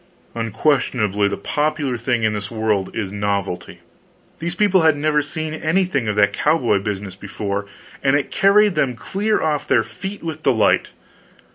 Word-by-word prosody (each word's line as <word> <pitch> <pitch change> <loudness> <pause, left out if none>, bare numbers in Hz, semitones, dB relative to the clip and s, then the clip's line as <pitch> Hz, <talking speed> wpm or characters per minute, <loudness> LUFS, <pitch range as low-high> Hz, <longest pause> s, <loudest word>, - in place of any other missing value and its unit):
Unquestionably, 115 -3 +1
the 100 - -3
popular 150 -3 -1
thing 120 0 -1
in 110 -1 +2
this 105 -1 -4
world 110 -4 0
is 100 -4 -3
novelty. 100 -3 -3 0.6
These 170 +2 -3
people 195 -1 +3
had 160 -2 +4
never 150 0 +2
seen 155 +1 -4
anything 160 - 0
of 105 - 0
that 100 -1 +3
cowboy 120 -10 +2
business 100 -1 -4
before, 100 +1 -4 0.3
and 135 0 +3
it 145 -2 -1
carried 205 +1 +4
them 135 -6 0
clear 205 - -1
off 150 -2 -1
their 115 - +3
feet 190 - -8
with 160 -2 -5
delight. 125 -7 +2
130 Hz, 155 wpm, -20 LUFS, 105-155 Hz, 0.6 s, had